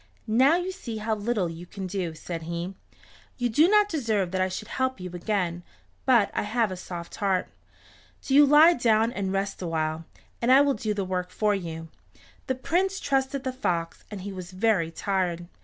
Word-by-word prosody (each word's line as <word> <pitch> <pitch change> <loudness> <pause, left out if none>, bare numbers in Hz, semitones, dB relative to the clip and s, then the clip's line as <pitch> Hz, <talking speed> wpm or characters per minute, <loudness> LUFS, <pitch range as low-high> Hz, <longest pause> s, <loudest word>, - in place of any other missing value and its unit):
"Now 255 +8 +4
you 360 +1 -1
see 240 - -6
how 220 +1 -1
little 210 -3 0
you 165 +1 -8
can 195 +1 -6
do," 180 -3 -3
said 165 +1 -6
he. 170 +2 -3 0.6
"You 245 -1 0
do 300 +9 +5
not 420 +1 +5
deserve 220 - -1
that 185 0 0
I 185 - +1
should 215 +4 -6
help 260 -2 -1
you 180 -1 -6
again, 175 -2 -1 0.5
but 235 -6 +4
I - - 0
have 220 0 0
a - - -3
soft 175 -2 -8
heart. 195 -3 0 0.7
Do 265 - -2
you 290 +2 +8
lie 305 +4 +8
down 225 -4 +2
and 195 -5 -2
rest 195 0 -2
awhile, 160 -1 -2 0.4
and 240 +2 +3
I 265 - +8
will 285 -1 +3
do 215 -2 -2
the 200 -2 -1
work 180 -1 -2
for 210 +1 +1
you." 165 -4 -5 0.6
The 260 - 0
Prince 375 +9 0
trusted 270 0 0
the 260 -1 -2
fox, 170 -10 -2
and 205 -3 -7
he 200 +1 -6
was 185 -2 -7
very 190 -4 +2
tired. 175 -1 -1
205 Hz, 195 wpm, -26 LUFS, 180-255 Hz, 0.7 s, you